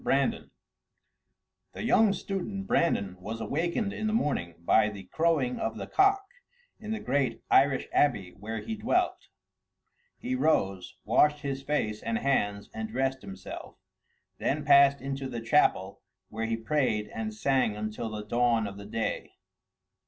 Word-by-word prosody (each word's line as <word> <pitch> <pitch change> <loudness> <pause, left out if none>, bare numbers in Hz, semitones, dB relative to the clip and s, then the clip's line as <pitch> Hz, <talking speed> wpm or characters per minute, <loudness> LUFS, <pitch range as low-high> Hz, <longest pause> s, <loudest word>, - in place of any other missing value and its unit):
BRANDAN - - +1 1.2
The - - -6
young 220 -2 +4
student 195 +1 -4
Brandan 100 - +1
was 110 +4 -5
awakened 170 - -1
in 215 - -2
the 215 - 0
morning 110 - -1
by 110 +3 +4
the 100 -2 -9
crowing 145 - 0
of 110 - -2
the - - -5
cock 395 0 +3 0.5
in 215 - -8
the 220 0 -2
great 130 -2 -1
Irish 135 -1 +4
abbey 100 -11 +2
where 105 +4 -6
he 225 - -5
dwelt; 260 +12 0 0.9
he 255 +1 -4
rose, 95 - 0
washed 150 0 +3
his 135 -2 -3
face 125 -7 -1
and 115 -1 -1
hands 105 -7 0
and 110 0 -4
dressed 135 +3 -1
himself, 95 -1 -9 0.6
then 145 +1 -1
passed 140 -1 +6
into 135 0 -4
the 120 -2 -4
chapel, 115 -5 +2 0.3
where 110 +1 -3
he 115 0 -1
prayed 115 -4 0
and 220 -1 -4
sang 135 - +1
until 110 +2 -4
the 105 -1 -5
dawn 120 0 +2
of 100 -1 -6
the 100 0 -9
day. 110 +1 -3
130 Hz, 150 wpm, -28 LUFS, 105-160 Hz, 1.2 s, passed